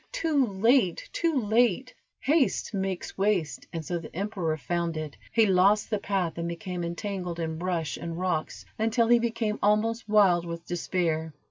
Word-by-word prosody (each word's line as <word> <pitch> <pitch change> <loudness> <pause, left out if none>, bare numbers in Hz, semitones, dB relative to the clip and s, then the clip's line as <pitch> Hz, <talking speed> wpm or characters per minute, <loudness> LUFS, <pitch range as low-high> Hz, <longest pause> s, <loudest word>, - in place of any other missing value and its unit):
Too 315 - +1
late! 205 -1 +2
too 330 -5 +1
late!" 235 +2 +2 0.3
"Haste 285 -4 +1
makes 190 -1 -3
waste," 195 -7 0
and 165 -2 -5
so 175 +1 -2
the 160 - -11
emperor 180 -5 -2
found 170 +3 -2
it. 155 -2 -5 0.2
He 225 -1 +4
lost 200 +3 +3
the 210 - +1
path 185 -5 -1
and 170 - -2
became 175 +1 -4
entangled 175 0 -4
in 160 -1 -3
brush 170 -3 -2
and 170 -1 -5
rocks, 180 -4 -2
until 225 +1 +2
he 240 0 +6
became 230 -2 -1
almost 215 +2 +1
wild 195 -5 +5
with 170 0 -6
despair. 165 -3 -1
190 Hz, 160 wpm, -27 LUFS, 170-225 Hz, 0.3 s, he